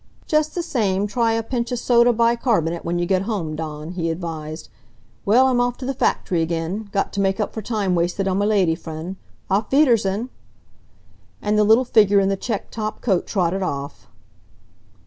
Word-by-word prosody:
"Just 305 0 +1
the 350 - -1
same, 205 - 0
try 225 +2 +1
a 225 0 -1
pinch 235 0 -3
of 245 - -1
soda 240 0 +4
bicarb'nate 230 - +1
when 170 +1 -2
you 175 - 0
get 185 +1 +1
home, 195 -7 -3
Dawn," 155 0 -6
he 170 -2 -2
advised. 160 -2 -5 0.6
"Well, 240 +6 +5
I'm 250 -2 +2
off 245 0 0
to 260 - -7
the 270 - -1
factory 180 -8 0
again. 170 +6 -3
Got 200 - -1
t' 200 - -1
make 195 +1 0
up 210 - -2
for 220 - -4
time 205 -4 -1
wasted 175 +3 0
on 190 +1 +1
m' 205 - +1
lady 190 -6 +3
friend. 165 +2 -7 0.4
Auf 200 +4 0
wiedersehen!" 235 -6 +2 1.1
And 210 - 0
the 210 - +4
little 220 +5 +5
figure 205 -4 +4
in 195 0 +2
the 195 - +1
checked 210 +1 -4
top 215 -1 -4
coat 190 -7 0
trotted 190 -1 0
off. 140 -6 -5
200 Hz, 185 wpm, -21 LUFS, 175-230 Hz, 1.1 s, Well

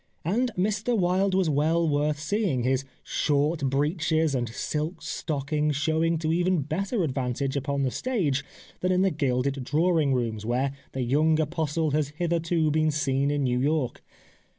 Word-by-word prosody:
And 235 +9 +1
Mr 215 +5 0
Wilde 185 +1 +2
was 190 -2 +2
well 160 +3 +2
worth 150 0 +1
seeing, 155 - 0
his 130 +1 +1 0.2
short 150 +1 0
breeches 155 +2 +1
and 120 -3 -1
silk 155 +8 -3
stockings 150 0 -1
showing 160 +3 +1
to 160 0 0
even 175 -2 +1
better 195 - -1
advantage 135 -1 -2
upon 140 0 -1
the 130 - 0
stage 180 - -1 0.4
than 180 - 0
in 185 +1 +3
the 195 - +3
gilded 135 -2 0
drawing 155 -1 +2
rooms, 115 -4 -2
where 125 +4 0 0.2
the 130 - -2
young 155 +5 +2
apostle 160 0 0
has 150 0 +1
hitherto 165 -2 +1
been 155 +1 +2
seen 140 -2 0
in 145 -1 0
New 125 -1 +1
York. 145 -1 0
150 Hz, 155 wpm, -26 LUFS, 140-170 Hz, 0.4 s, in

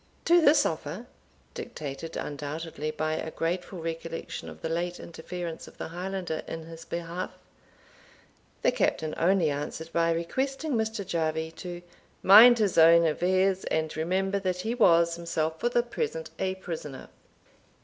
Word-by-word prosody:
To 345 +1 +6
this 295 -1 +5
offer, 160 +7 -3 0.5
dictated 160 - -6
undoubtedly 150 +1 -4
by 155 0 -2
a 160 - -3
grateful 175 +3 -3
recollection 165 0 -5
of - - -12
the - - 0
late 175 +2 -2
interference 170 0 -7
of - - -15
the - - -5
Highlander 180 -1 -4
in 165 0 -5
his 165 0 -10
behalf, 170 +2 -4 1.3
the - - +4
Captain 155 -1 0
only 175 -3 +3
answered 150 +3 -5
by 165 0 +2
requesting 270 - -2
Mr. 220 -4 -1
Jarvie 160 -1 -1
to 175 +1 -7 0.4
"mind 230 +5 +9
his 205 -6 +2
own 165 +1 +7
affairs, 185 +4 +2
and 160 -1 -1
remember 190 +5 0
that 185 -2 -2
he 225 +4 -2
was 170 -7 +4
himself 160 -2 -2
for 240 - +1
the 240 0 +2
present 465 - -4
a 190 0 -1
prisoner." 160 -7 -7
170 Hz, 145 wpm, -28 LUFS, 160-195 Hz, 1.3 s, mind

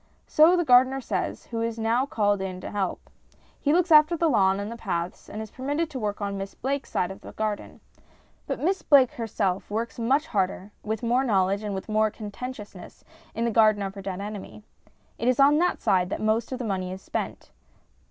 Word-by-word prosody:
So 325 +4 +5
the 345 - +1
gardener 260 +1 +5
says, 210 -7 -3
who 230 -1 -4
is 230 0 -2
now 230 +4 +1
called 205 -6 +1
in 185 -1 -4
to - - -7
help. 195 -3 -3 0.5
He 290 - +1
looks 355 +2 +2
after 305 +2 +6
the 325 -1 +2
lawn 195 -4 +3
and 205 +2 -4
the - - -5
paths, 175 -6 -4
and 215 +1 -5
is 220 - -11
permitted 290 +5 -2
to 265 - -5
work 210 -2 -3
on 200 -1 -3
Miss 195 0 -6
Blake's 275 +1 -3
side 180 - -1
of 190 - -10
the - - -11
garden. 215 -1 -4 0.7
But - - -3
Miss 380 +5 0
Blake 270 -4 +5
herself 200 -5 -2
works 225 +3 -3
much 270 +7 +2
harder, 195 - -2
with 220 +2 -4
more 245 +3 +2
knowledge, 200 -4 +1
and 205 -2 -3
with 190 - -6
more 215 0 +2
conscientiousness 210 -2 -9 0.3
in 230 +1 -1
the 235 - +1
garden 215 -2 +4
of 195 0 -4
her 195 - -8
dead 190 0 -5
enemy. 210 0 -7 0.6
It 235 - -1
is 255 0 +2
on 285 +2 +6
that 360 +1 0
side 180 -2 +2
that - - -3
most 220 +2 0
of 260 - -2
the 250 - -4
money 185 -3 -2
is 190 +1 -8
spent. - - -5
220 Hz, 210 wpm, -26 LUFS, 200-260 Hz, 0.7 s, after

